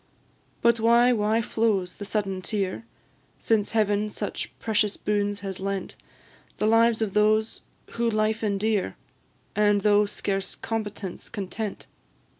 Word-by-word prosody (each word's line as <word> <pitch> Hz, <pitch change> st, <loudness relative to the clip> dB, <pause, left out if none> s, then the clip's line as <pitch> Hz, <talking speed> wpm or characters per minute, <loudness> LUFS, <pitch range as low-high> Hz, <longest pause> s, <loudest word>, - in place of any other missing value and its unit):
But 235 Hz, -1 st, +4 dB
why, 235 Hz, +2 st, +5 dB
why 220 Hz, +1 st, +1 dB
flows 210 Hz, -6 st, 0 dB
the 205 Hz, -, -6 dB
sudden 195 Hz, -2 st, -1 dB
tear, 195 Hz, +2 st, -2 dB, 0.5 s
Since 220 Hz, -2 st, +1 dB
Heaven 210 Hz, -1 st, +2 dB
such -, -, -4 dB
precious 210 Hz, -2 st, 0 dB
boons 205 Hz, -1 st, -1 dB
has 195 Hz, -2 st, -5 dB
lent, 195 Hz, 0 st, -3 dB, 0.6 s
The -, -, 0 dB
lives 225 Hz, +1 st, +4 dB
of 200 Hz, -3 st, -3 dB
those 215 Hz, +1 st, +2 dB, 0.3 s
who 235 Hz, 0 st, 0 dB
life 215 Hz, 0 st, 0 dB
endear, 210 Hz, -1 st, 0 dB, 0.6 s
And, 205 Hz, -1 st, +3 dB
though 205 Hz, 0 st, +4 dB
scarce 195 Hz, -1 st, -3 dB
competence, 210 Hz, -4 st, -5 dB
content? 205 Hz, 0 st, -5 dB
210 Hz, 125 wpm, -26 LUFS, 200-225 Hz, 0.6 s, why